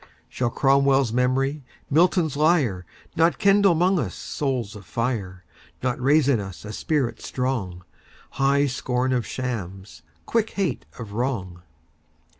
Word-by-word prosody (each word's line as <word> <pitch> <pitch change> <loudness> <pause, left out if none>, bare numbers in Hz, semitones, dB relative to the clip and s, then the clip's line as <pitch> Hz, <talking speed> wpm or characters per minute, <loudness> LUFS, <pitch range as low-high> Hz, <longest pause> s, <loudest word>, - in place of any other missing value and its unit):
Shall 125 -2 -1
Cromwell's 135 -2 +3
memory, 135 +3 +1 0.2
Milton's 165 0 +2
lyre, 140 - +2 0.3
Not 165 +1 +3
kindle 200 -3 +4
'mong 180 +3 +2
us - - -3
souls 125 -8 -3
of 105 - -10
fire, 95 -3 -3 0.4
Not 125 0 -1
raise 145 +2 +4
in 135 -5 +3
us 95 -1 -8
a 105 - -6
spirit 140 0 -1
strong—High 130 +4 -2
scorn 125 -1 -1
of 120 -2 -1
shams, 95 -9 -5 0.2
quick 225 -1 0
hate 195 -3 -2
of 115 -4 -8
wrong? 105 -8 -3
130 Hz, 125 wpm, -24 LUFS, 110-145 Hz, 0.4 s, kindle